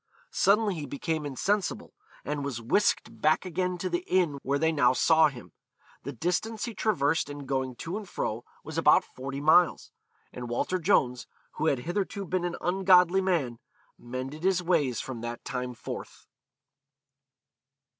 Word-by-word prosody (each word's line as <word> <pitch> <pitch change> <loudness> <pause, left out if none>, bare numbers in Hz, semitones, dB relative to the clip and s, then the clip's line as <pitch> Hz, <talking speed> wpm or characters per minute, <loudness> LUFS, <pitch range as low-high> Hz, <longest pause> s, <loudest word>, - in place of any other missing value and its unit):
Suddenly 210 0 +3
he 150 -4 -5
became 150 +3 -3
insensible, 195 +8 -1 0.3
and 145 0 -2
was 135 -4 -3
whisked 120 - 0
back 155 +4 +3
again 180 +1 -1
to 185 - -3
the 175 0 -2
inn 170 -7 +1
where 140 +1 0
they 160 +2 +2
now 130 -5 +4
saw 160 +4 +5
him. 120 - -9 0.5
The 140 - -6
distance 180 - -2
he 235 - -5
traversed 165 -9 +1
in 145 -1 -7
going 130 -2 -2
to 170 - -5
and 210 -4 -8
fro 110 +3 -3 0.2
was - - -4
about - - +5
forty 135 +2 -7
miles. 160 +3 +4 0.4
And 125 -1 -6
Walter 180 +10 -1
Jones, 125 -9 +1 0.2
who 160 - -2
had 135 -5 +1
hitherto 195 +5 -3
been 180 0 -1
an 175 - -2
ungodly 185 0 +4
man, 155 -11 0 0.4
mended 130 +5 -6
his 185 0 +2
ways 155 -8 +1
from 125 -4 -6
that 120 0 -6
time 125 -1 -4
forth. - - -8
155 Hz, 155 wpm, -28 LUFS, 130-185 Hz, 0.5 s, saw